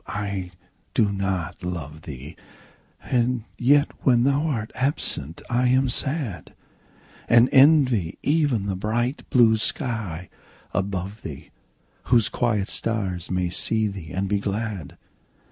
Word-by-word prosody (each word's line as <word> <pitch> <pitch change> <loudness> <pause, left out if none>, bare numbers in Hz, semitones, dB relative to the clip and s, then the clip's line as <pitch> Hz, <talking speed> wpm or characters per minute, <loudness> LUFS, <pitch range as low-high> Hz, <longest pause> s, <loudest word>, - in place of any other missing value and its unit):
I 100 -3 -3 0.5
do 105 -2 +3
not 95 -4 -3
love 85 -4 -5
thee! 75 +1 -9 0.7
And 125 -1 0 0.2
yet 145 +4 +4
when 120 -3 +4
thou 140 +4 +2
art 115 -7 -2
absent 125 - -2
I 125 +1 +1
am 130 +1 +3
sad; 125 - -2 0.7
And 120 +2 +6
envy 130 - +4
even 145 -9 +1
the 100 -2 -2
bright 120 +7 -2
blue 115 -3 +5
sky 110 - -3 0.5
above 100 +1 -3
thee, - - -9 0.5
Whose 120 -3 +3
quiet 105 -5 0
stars 95 -6 -1
may 90 -1 -1
see 110 +4 +2
thee 95 -5 -7
and 95 +2 -2
be 100 +1 +1
glad. 100 -5 -4
110 Hz, 125 wpm, -24 LUFS, 95-125 Hz, 0.7 s, And